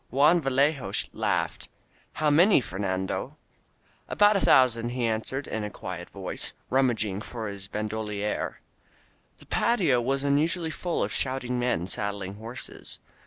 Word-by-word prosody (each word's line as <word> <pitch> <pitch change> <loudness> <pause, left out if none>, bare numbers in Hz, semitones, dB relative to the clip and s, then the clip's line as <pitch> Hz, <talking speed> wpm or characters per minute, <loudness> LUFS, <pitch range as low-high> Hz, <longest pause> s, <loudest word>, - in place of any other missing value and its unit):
Juan 150 +6 +4
Vallejo 135 0 +1 0.2
laughed: - - -1 0.4
"How 155 -1 +1
many, 175 +6 +6
Fer 95 -6 -6
nando?" 95 -1 -2 0.7
"About 205 0 +5
a - - +3
thousand," 120 -7 +4
he 125 0 -1
answered 115 +5 -2
in 110 - -3
a 105 - -3
quiet 90 -3 -7
voice, 95 -2 -4 0.2
rummaging 110 -7 +1
for 115 -1 -5
his 100 -1 -6
bandolier. 105 0 -3 0.8
The - - -16
patio 175 - +2
was 135 +3 0
unusually 160 +4 +1
full 175 +1 -1
of - - -2
shouting 130 -2 -1
men 120 -9 0
sad 100 +2 -2
dling 100 0 -6
horses. 115 +4 -6
120 Hz, 140 wpm, -27 LUFS, 105-140 Hz, 0.8 s, many